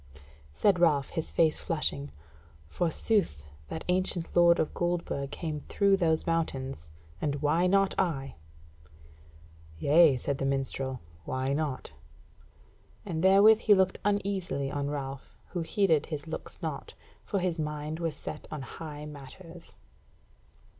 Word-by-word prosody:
Said 185 - +2
Ralph, 150 -6 +3
his 160 -2 -4
face 160 -2 +3
flushing: 150 -3 -2 0.6
"Forsooth, 170 - +1 0.2
that 160 - -6
ancient 180 -2 +1
lord 170 0 +6
of 155 - -1
Goldburg 175 -5 -2
came 155 -2 -4
through 200 -1 +3
those 165 -4 +1
mountains, 135 - -2 0.3
and 145 -2 0
why 150 +5 +2
not 195 +1 +3
I?" 140 -8 -1 1.4
"Yea," 145 - +5
said 140 +2 -3
the 135 - -1
minstrel, 135 -1 -2 0.2
"why 130 +1 -2
not?" 145 - -3 1.1
And 165 -4 -3
therewith 200 +3 +7
he 210 -2 +5
looked 190 -1 +2
uneasily 195 -8 -1
on 145 0 -2
Ralph, 135 -2 -6
who 175 - -3
heeded 165 -4 +2
his 150 -2 -5
looks 160 - -7
naught, - - -5 0.3
for 200 - -2
his 180 -3 -1
mind 150 +1 -3
was 165 -2 -2
set - - -7
on 150 -3 -5
high 150 +1 -8
matters. 165 +4 -11
160 Hz, 130 wpm, -29 LUFS, 140-180 Hz, 1.4 s, therewith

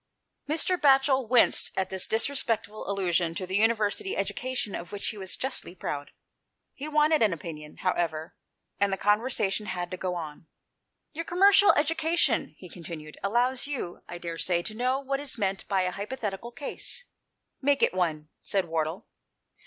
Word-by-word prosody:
Mr. 330 +4 +2
Batchel 270 -3 +4
winced 245 -2 +6
at 190 0 -1
this 190 -1 +2
disrespectful 220 -4 0
allusion 175 -4 0
to 185 - -3
the 190 +2 -1
University 225 - +1
education 255 -6 -2
of 175 - -6
which 205 - -3
he 215 - -6
was 190 -1 -3
justly 260 -8 -3
proud. 145 -4 -4 0.6
He 285 - -6
wanted 305 0 +3
an 210 -5 +4
opinion, 150 -2 -8
however, 165 -4 -1 0.4
and 200 0 +2
the 195 - 0
conversation 210 -1 +1
had 180 -2 -3
to 185 - -4
go 180 0 -2
on. 160 -1 -7 0.3
" - - -53
Your 330 +2 -4
commercial 395 +3 +6
education," 325 +2 +1
he 185 - -11
continued, 165 -3 -9
" - - -31
allows 245 +6 +2
you, 255 -12 -5
I 175 - -6
daresay, 175 +1 -1
to 215 - -5
know 250 +4 0
what 275 0 -2
is 285 -3 -2
meant 195 -3 -1
by 195 -2 +2
a 180 - 0
hypothetical 210 +2 -5
case." 290 - -4 0.3
" - - -52
Make 280 0 +2
it - - +3
one," 160 -4 -1
said 195 -2 0
Wardle. 160 +1 -2
205 Hz, 170 wpm, -28 LUFS, 175-265 Hz, 0.6 s, winced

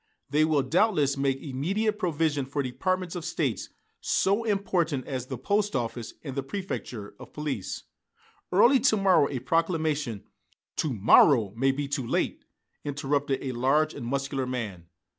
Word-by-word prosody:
"They 155 +1 +4
will, 150 -3 +2
doubtless, 150 - +2
make 135 -1 0
immediate 195 +11 -1
provision 155 -5 0
for 140 +1 -2
departments 180 +8 -2
of 175 - -4
State 160 -7 -2 0.3
so 200 +4 +1
important 180 - 0
as 130 -2 -4
the 130 - -5
post 205 - 0
office 120 -1 -3
and 140 -4 -5
the 140 - -1
préfecture 135 - -5
of - - -12
police. 145 -10 -4 0.7
Early 235 +9 +6
to 220 -3 +3
morrow 190 -7 +4
a 135 - -3
proclamation 150 - 0 0.3
" - - -42
"To 155 - 0
morrow 110 0 +5
may 135 +3 +3
be 140 +1 -3
too 135 -3 -2
late," - - -1 0.4
interrupted 140 -1 -1
a 135 - -2
large 140 +6 +2
and 120 - -6
muscular 135 0 -2
man. 105 -9 -4
145 Hz, 155 wpm, -27 LUFS, 130-175 Hz, 0.7 s, Early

